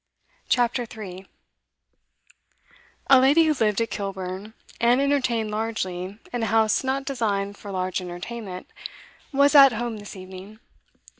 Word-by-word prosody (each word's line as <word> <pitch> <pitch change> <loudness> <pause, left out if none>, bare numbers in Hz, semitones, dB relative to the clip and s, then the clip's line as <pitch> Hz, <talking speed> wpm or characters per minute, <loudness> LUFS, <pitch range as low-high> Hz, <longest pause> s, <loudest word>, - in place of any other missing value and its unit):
CHAPTER 245 0 +1
3 195 -4 -9 1.8
A 265 - +9
lady 280 +6 +5
who 315 -1 +3
lived 215 -6 +1
at 230 - -2
Kilburn, 195 +1 -5 0.2
and 240 +2 +4
entertained 260 -6 +1
largely 200 -3 -3 0.2
in 245 - -2
a 225 - 0
house 220 +1 +2
not 270 +1 -1
designed 205 -7 -1
for 205 - -11
large 185 -1 -2
entertainment, 185 +2 -7 0.7
was 280 +1 +4
'at 275 -3 +8
home' 230 0 -3
this 205 -1 -10
evening. 190 +3 -11
220 Hz, 130 wpm, -24 LUFS, 195-245 Hz, 1.8 s, A